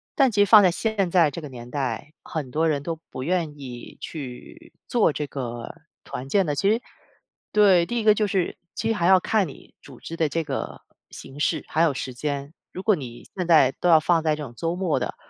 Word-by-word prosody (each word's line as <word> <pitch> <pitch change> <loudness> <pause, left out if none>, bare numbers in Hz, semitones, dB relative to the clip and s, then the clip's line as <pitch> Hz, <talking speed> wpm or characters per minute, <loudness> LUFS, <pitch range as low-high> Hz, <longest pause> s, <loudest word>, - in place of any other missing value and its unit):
但 270 -4 +4
其 205 -2 +2
实 - - +3
放 210 +1 +8
在 190 - +5
现 200 +1 -1
在 170 -4 +4
这 170 - -6
个 150 - -8
年 120 -2 -10
代， 135 0 -3
很 150 -7 -5
多 160 +4 +1
人 145 -2 -1
都 165 +2 -3
不 130 - -6
愿 160 -2 -1
意 125 -3 -9
去 130 -6 -9
做 235 -8 +3
这 150 - -3
个 120 -4 -6 0.3
团 130 +2 -7
建 195 +4 +3
的。 145 -2 -1
其 195 +8 +2
实 225 +3 +2 0.7
对， 195 -5 +5
第 240 +6 -2
一 - - -2
个 215 -1 +6
就 210 0 0
是 195 -3 -1 0.2
其 225 - -2
实 - - +3
还 175 -5 0
要 190 0 +7
看 205 0 +1
你 140 - -14
组 135 -4 -14
织 165 - -7
的 160 -2 +1
这 165 +2 -1
个 - - -5 0.3
形 135 +2 -11
式， - - 0
还 160 - 0
有 165 -4 +4
时 130 0 -5
间。 140 +2 -4 0.2
如 185 - -7
果 210 -1 +4
你 120 -6 -8
现 180 -3 -3
在 155 -6 +6
都 180 - +2
要 160 -2 +8
放 165 +1 +2
在 155 -1 +2
这 150 - -6
种 125 -4 -9
周 165 +6 -2
末 180 -3 0
的， - - -3
160 Hz, 250 characters per minute, -24 LUFS, 140-190 Hz, 0.7 s, 放